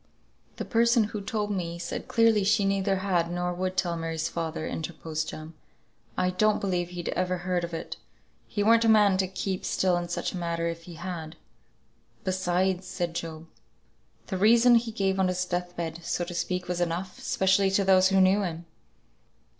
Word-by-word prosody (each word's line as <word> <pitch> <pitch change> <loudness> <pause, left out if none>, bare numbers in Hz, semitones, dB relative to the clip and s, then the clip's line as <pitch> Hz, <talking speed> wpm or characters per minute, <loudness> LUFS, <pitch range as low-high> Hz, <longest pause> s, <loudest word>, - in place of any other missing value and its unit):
"The - - -5
person 235 0 +3
who 210 0 -4
told 210 +1 -2
me 170 -3 -3
said 170 - -5
clearly 225 -3 +3
she 205 +1 +3
neither 195 0 +1
had, 185 -3 0
nor 180 0 -1
would 185 +1 -3
tell 175 -2 +1
Mary's 165 -1 -2
father," 165 -1 -3
interposed 155 -1 -4
Jem. 155 +1 -8 0.6
"I 185 0 +1
don't 215 +3 +2
believe 180 -3 -1
he'd 175 -1 -5
ever 185 0 -1
heard 180 0 -1
of 170 - -4
it; 165 0 -6 0.5
he 205 - -1
weren't 230 +2 +5
a 225 - +3
man 210 -3 +5
to 190 0 +1
keep 190 0 -3
still 185 -1 +1
in 175 0 -4
such 175 - -2
a - - -4
matter, 170 -1 -2
if 165 0 -5
he 175 - -10
had." 165 -2 -6 0.9
"Besides," 185 0 0
said 175 -2 -3
Job, 165 -1 -5 0.8
"the 190 - -3
reason 235 +4 +6
he 230 -1 +3
gave 195 -3 0
on 190 - +3
his 180 0 -1
death 180 0 -3
bed, 165 -1 -4
so 175 +1 -2
to 175 - -7
speak, 180 +1 -2
was 175 0 -2
enough; 175 +2 -3
'specially 190 +1 +2
to 195 +1 +2
those 190 -1 +5
who 195 0 +3
knew 190 +2 +4
him." 170 -3 -4
185 Hz, 185 wpm, -27 LUFS, 170-195 Hz, 0.9 s, reason